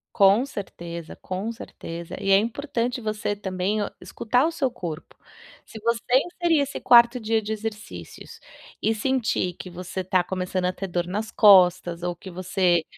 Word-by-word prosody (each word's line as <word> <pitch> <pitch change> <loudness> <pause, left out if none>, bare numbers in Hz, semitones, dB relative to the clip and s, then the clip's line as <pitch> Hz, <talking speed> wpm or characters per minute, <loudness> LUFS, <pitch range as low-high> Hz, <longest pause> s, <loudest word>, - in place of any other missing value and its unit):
Com 200 +5 +5
certeza, 170 - -7
com 190 +5 -4
certeza. 170 -6 -8
E 195 - -2
é 195 - +7
importante 240 +2 -2
você 215 -1 -2
também 195 +1 -2
o 205 - -2
escutar 250 +4 0
o 330 - 0
seu 290 -5 0
corpo. 170 -10 -7 0.5
Se 220 - -10
você 235 0 0 0.2
inserir 345 -3 +1
esse 280 0 -2
4º 235 +1 +6
dia 225 0 0
de 215 0 -5
exercícios 220 +1 -7 0.4
e 220 - +1
sentir 225 -6 0
que 180 +1 -10
você 180 +1 -5
tá 185 0 +2
começando 185 0 -2
a 180 - +2
ter 195 - -5
dor 175 -1 -2
nas 210 +4 -3
costas, 180 -4 +5
ou 175 0 -2
que 190 - -11
você 180 -1 +1
205 Hz, 165 wpm, -24 LUFS, 180-230 Hz, 0.5 s, é